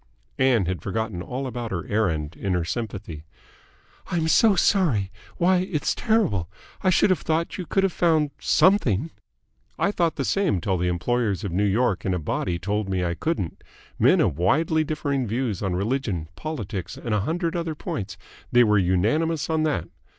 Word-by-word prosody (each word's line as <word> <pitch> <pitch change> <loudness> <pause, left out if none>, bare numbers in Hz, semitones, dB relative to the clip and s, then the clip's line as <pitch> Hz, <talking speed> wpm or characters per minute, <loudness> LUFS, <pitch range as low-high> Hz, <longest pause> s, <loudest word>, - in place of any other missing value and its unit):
Ann 125 -7 +3
had 90 -3 -3
forgotten 110 -2 -3
all 130 +8 -4
about 120 -2 -4
her 90 -4 -3
errand 85 -8 -1
in 95 +4 -2
her 85 -2 0
sympathy. 100 -7 -5 0.8
"I'm 165 -3 0
so 210 +5 +5
sorry. 150 - +2 0.3
Why, 185 +2 +3
it's 180 -4 -1
terrible! 195 - +1 0.3
I 185 - +2
should 185 +2 +4
have 185 - +2
thought 165 +3 -1
you 180 - -5
could 195 - +1
have 195 -3 +1
found 160 -4 +2
something." 160 - +3 0.7
"I 200 - +1
thought 170 -5 0
the 135 - -2
same 195 - +1
till 95 +1 -1
the 90 - 0
employers 105 +4 0
of 100 - -3
New 100 +4 +1
York 105 -1 +1
in 95 -2 0
a - - -2
body 85 +2 -2
told 100 +3 -2
me 95 -2 0
I 85 - 0
couldn't. 95 - -3 0.4
Men - - +5
of 70 - 0
widely 155 - +2
differing 145 -4 -2
views 115 -2 -2
on 95 -3 -1
religion, 100 - -2
politics, 105 - -5
and 115 - -3
a 105 - +2
hundred 165 - -1
other 165 -2 -2
points, 100 -8 -5 0.3
they 120 0 +6
were 105 -2 +4
unanimous 130 - +1
on 160 -1 +1
that. 120 - -1
115 Hz, 180 wpm, -24 LUFS, -, 0.8 s, they